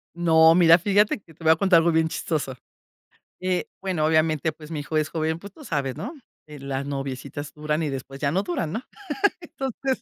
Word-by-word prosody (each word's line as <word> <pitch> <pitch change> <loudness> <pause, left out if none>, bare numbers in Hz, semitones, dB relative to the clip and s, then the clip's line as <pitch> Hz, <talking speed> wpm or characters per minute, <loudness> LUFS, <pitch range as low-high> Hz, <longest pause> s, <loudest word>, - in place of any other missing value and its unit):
No, 160 -1 +6
mira, 170 -2 +7
fíjate 205 +4 +2
que 165 - -19
te 165 - -15
voy 160 - +6
a - - -1
contar 190 0 +4
algo 170 +1 +4
bien 160 0 +2
chistoso, 145 -7 -2 0.9
eh, 185 -1 0 0.2
bueno, 185 -5 -1
obviamente, 155 0 +2
pues, 155 +1 -13
mi 155 -2 -3
hijo 155 +2 -4
es 155 0 0
joven, 160 0 -1
pues, 200 +2 -11
tú 300 - -14
sabes, 140 - -2
¿no? 240 - -5 0.3
De 150 -1 -10
las 135 0 -4
noviecitas 135 +1 -5
duran 150 +1 -1
y 155 - -1
después 135 0 -6
ya 140 - +1
no 190 +3 +1
duran, 170 -4 -2
¿no? 225 +4 -3 0.6
Entonces, 270 -4 -3
160 Hz, 205 wpm, -24 LUFS, 150-180 Hz, 0.9 s, mira